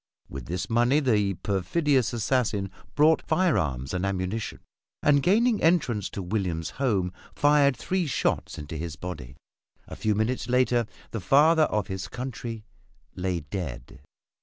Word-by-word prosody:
With - - -8
this 90 +2 -3
money 120 +5 +3
the 105 -8 +1
perfidious 120 - +1
assassin 110 -4 0 0.2
bought 155 +2 +5
firearms 75 - 0
and 90 0 -1
ammunition, 100 +3 -3 0.4
and 145 -1 +4
gaining 220 - +3
entrance 145 - +2
to 100 - -5
William's 90 -4 -2
home 95 -9 +1 0.2
fired 145 -2 +4
three 185 +5 -1
shots 135 - -1
into 75 +2 -6
his 80 -1 -5
body. 75 -6 -7 0.5
A - - -8
few 110 -1 0
minutes 110 +2 -1
later 125 -2 +2 0.2
the 115 - -3
"father 155 - +5
of 105 -7 -1
his 95 -1 -5
country" 120 -3 -6 0.5
lay 90 -2 -2
dead. 70 -8 -6
110 Hz, 135 wpm, -26 LUFS, 90-140 Hz, 0.5 s, bought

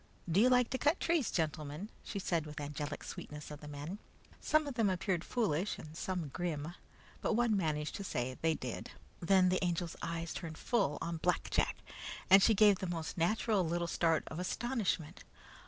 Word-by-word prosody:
Do 170 +3 +3
you 250 - +6
like 250 -1 +4
to 260 - -1
cut 295 +5 +3
trees, 330 -7 +2
gentlemen?" 155 +3 -2
she - - -5
asked 170 -4 0
with 150 0 -7
angelic 145 0 -4
sweetness 150 0 -7
of 150 - -7
the 150 - -9
men. 150 +7 -6 0.4
Some 310 0 +3
of 285 - -4
them 225 -4 +2
appeared 185 -1 0
foolish 205 -6 0
and 155 0 -10
some 175 -3 -3
grim, 160 0 -3 0.5
but - - +1
one 235 -2 +3
managed 155 -5 0
to 200 - -5
say 130 -8 -2
they 160 -1 +3
did. - - -5 0.3
Then 185 +1 +4
the 185 +1 +1
Angel's 175 -1 -1
eyes 165 0 -3
turned 160 -3 -6
full 195 - +1
on 170 0 -2
Black 175 +2 0
Jack, - - +2 0.6
and 195 +1 +10
she 220 +2 +5
gave 205 -1 +6
the 190 - -3
most 165 -2 -3
natural 200 +3 +2
little 170 +1 0
start 165 -1 +2
of 155 - -5
astonishment. 190 - -1
175 Hz, 190 wpm, -34 LUFS, 155-205 Hz, 0.6 s, and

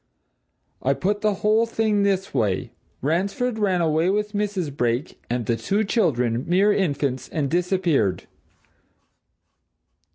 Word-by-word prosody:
I 135 +2 +1
put 205 +6 -1
the 210 -2 +1
whole 220 +2 +4
thing 220 -2 +1
this 195 -1 0
way. 105 -8 0 0.3
Ransford 200 - 0
ran 190 -4 +1
away 160 +2 +2
with 210 +2 -1
Mrs. 200 -8 -2
Brake 120 +1 -1
and 120 -1 -1
the 115 - +1
two 200 - 0
children 125 - +1
mere 195 +4 +4
infants 140 -9 -1
and 145 -4 -2
disappeared. 175 - +1
180 Hz, 125 wpm, -23 LUFS, 135-205 Hz, 0.3 s, whole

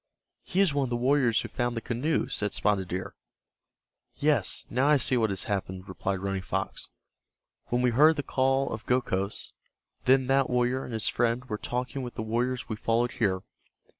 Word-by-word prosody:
"He 185 - 0
is 185 -7 +3
one 140 -1 +1
of - - -5
the 120 - -1
warriors 125 -2 +3
who - - -5
found 120 -2 -2
the - - +1
canoe," 130 +8 -1
said 105 -1 -1
Spotted 100 -3 +1
Deer. 90 +1 -4 1.0
"Yes, - - +1
now 130 +4 +1
I 150 0 +6
see 130 - +2
what 115 -3 +2
has 95 -1 -1
happened," 95 -2 -3
replied 95 +1 -3
Running 95 -1 -2
Fox. 95 +1 -3 0.8
"When 120 +1 0
we 125 - +3
heard 150 +7 +6
the 145 - -2
calls 135 +1 +1
of 110 0 -6
Gokhos, 105 -6 -1 0.5
then 130 +1 +5
that 135 +1 +2
warrior 125 +1 +1
and 120 - -7
his 110 -1 +1
friend 120 +1 +1
were 105 -3 -4
talking 125 +3 -3
with 125 -1 -6
the 110 - -3
warriors 120 +3 -1
we 110 - -4
followed 115 +2 +1
here. 95 -5 0
120 Hz, 190 wpm, -28 LUFS, 105-130 Hz, 1.0 s, I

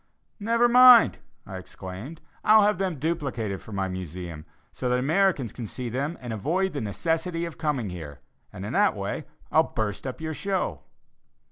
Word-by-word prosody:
"Never 230 +3 +3
mind," 250 -1 +8 0.3
I 95 - -7
exclaimed; 95 - -9 0.2
"I'll 215 0 +7
have 205 -3 +2
them 185 -5 -1
duplicated 130 - -2
for - - -12
my 95 -2 -1
Museum, 90 -3 -7 0.2
so 125 - -3
that 125 - +2
Americans 150 - +1
can 120 -3 -6
see 125 +3 -5
them 140 +8 -3
and 120 -2 -5
avoid 170 - 0
the 140 - -3
necessity 165 - -1
of 170 - -8
coming 135 - -1
here, 75 -5 -8 0.3
and - - -7
in - - -5
that - - +3
way - - -4 0.3
I'll - - +6
burst 105 +2 -3
up 130 - -5
your 160 0 -4
show." 195 +4 -2
135 Hz, 170 wpm, -26 LUFS, -, 0.3 s, mind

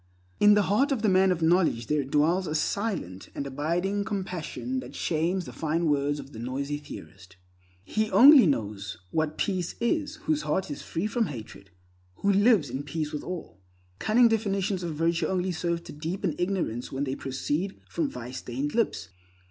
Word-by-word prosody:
In 205 0 +7
the 210 - +4
heart 240 +10 +2
of 245 -5 0
the 215 - +4
man 190 0 +4
of 170 -2 -1
knowledge 160 -8 +3
there 150 +1 +1
dwells 160 +7 +2
a 155 - -2
silent 155 - -2
and 140 - -3
abiding 170 +9 -1
compassion 195 +5 -3
that - - -9
shames 170 +3 0
the - - -9
fine 165 +2 -1
words 145 -1 +1
of 135 0 -10
the 110 - -8
noisy 140 +4 -3
theorist. 95 - -11 0.5
He 215 - -1
only 270 - +8
knows 105 - -2
what 155 -1 -1
peace 185 -3 -1
is 295 +5 0
whose 310 -1 +1
heart 190 -5 -1
is 145 - -5
free 165 +4 -3
from 220 +1 0
hatred, 110 -6 -9 0.5
who 200 - +1
lives 205 -5 +4
in 130 +2 -3
peace 150 +1 -3
with 150 - -4
all. 180 - -7 0.4
Cunning 235 +3 +5
definitions 200 -3 0
of 170 -3 -4
virtue 165 +2 +1
only 185 0 0
serve 170 0 -2
to - - -9
deepen 165 +6 -2
ignorance 175 - -1
when 135 +1 -2
they 135 -2 -2
proceed 145 +8 -3
from 315 -4 -1
vice 125 - -7
stained 135 +4 -4
lips. 225 - 0
170 Hz, 180 wpm, -27 LUFS, 140-200 Hz, 0.5 s, only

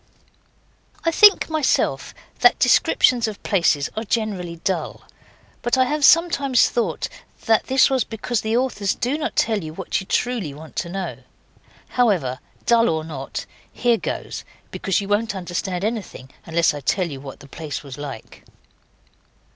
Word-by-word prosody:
I 330 - +3
think 410 +4 +6
myself 315 -3 0 0.2
that - - +5
descriptions 240 -3 +3
of 210 -2 -7
places 170 -7 +2
are 220 - -2
generally 200 -6 -2
dull, 175 -5 -2 0.6
but 240 +2 +1
I 260 - +5
have 295 +2 -2
sometimes 280 -6 +4
thought 235 - -1 0.4
that 225 +1 +2 0.2
was 265 -3 +1
because 225 +1 -3
the 220 +2 0
authors 225 -6 0
do 250 +4 -1
not 305 - -3
tell 215 -5 +1
you 155 0 -7
what 190 - -2
you 190 - -11
truly 225 - -1
want 155 +1 -12
to 170 - -2
know. 190 +1 -4 0.7
However, 180 - +1 0.3
dull 235 -1 +4
or 160 -1 -1
not, 140 -4 -6 0.3
here 240 -2 +2
goes - - -5 0.3
because 195 0 -1
you 200 - -6
won't 205 +1 0
understand 180 0 -3
anything 205 - -4 0.2
unless 165 -1 +2
I 145 - -5
tell 180 +6 0
you 140 -4 -7
what 135 -1 -9
the 140 - -14
place 150 -1 -6
was 140 -1 -9
like. 140 -6 -8
200 Hz, 155 wpm, -22 LUFS, 160-240 Hz, 0.7 s, think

